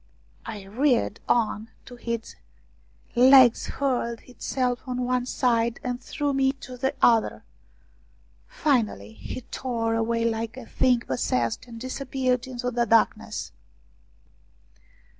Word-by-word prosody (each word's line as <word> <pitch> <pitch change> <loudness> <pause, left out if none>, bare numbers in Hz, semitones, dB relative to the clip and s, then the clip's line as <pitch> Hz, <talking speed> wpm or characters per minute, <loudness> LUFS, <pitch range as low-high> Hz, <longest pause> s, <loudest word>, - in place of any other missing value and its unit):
It 210 -4 -6
reared 240 0 +1
on 225 -1 +1 0.2
to 245 - -11
its 235 -1 -4 0.8
hind 250 +2 +6
legs, 260 -3 +7
hurled 245 -4 -1
itself 250 0 -2
on 250 0 -2
one 250 0 0
side, 235 -2 +1
and 245 0 -3
threw 290 +2 -2
me 270 0 +2
to 255 -2 -10
the 265 +3 -1
other; 230 -2 +3 1.0
finally 245 - 0
he 110 - -7
tore 235 -2 -2
away 230 +1 0
like 225 +1 -2
a 260 - -8
thing 245 +1 +2
possessed 125 - -1
and 230 -1 -9
disappeared 255 -1 -1
into 250 -1 -3
the 240 -1 0
darkness. 225 +1 +1
245 Hz, 120 wpm, -25 LUFS, 230-255 Hz, 1.0 s, legs